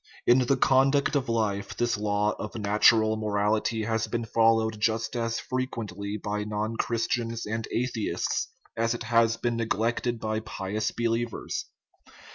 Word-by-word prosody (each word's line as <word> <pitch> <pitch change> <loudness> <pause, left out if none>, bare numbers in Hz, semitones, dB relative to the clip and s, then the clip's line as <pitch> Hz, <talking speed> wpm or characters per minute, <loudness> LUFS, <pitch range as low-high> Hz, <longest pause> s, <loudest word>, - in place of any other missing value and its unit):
In 120 +2 +6
the 130 +2 +2
conduct 135 +3 +3
of 135 -4 0
life 100 -3 -1
this 120 0 +1
law 105 0 +1
of 105 - -6
natural 110 +1 +4
mo 110 0 -3
rality 105 +2 +1
has 110 0 0
been 115 +1 -2
followed 115 -1 +2
just 115 +2 0
as 115 -1 -1
frequently 105 -6 -4
by 105 0 -3
non 105 +1 -2
Chris 115 0 -1
tians 115 -1 -2
and 110 +1 -3
atheists 120 -3 -1 0.3
as 115 +1 +1
it 120 - -6
has 115 0 +3
been 120 0 -1
neglected 115 +1 0
by 110 0 -1
pious 105 0 -3
believers. 115 -1 -2
115 Hz, 150 wpm, -27 LUFS, 105-115 Hz, 0.3 s, In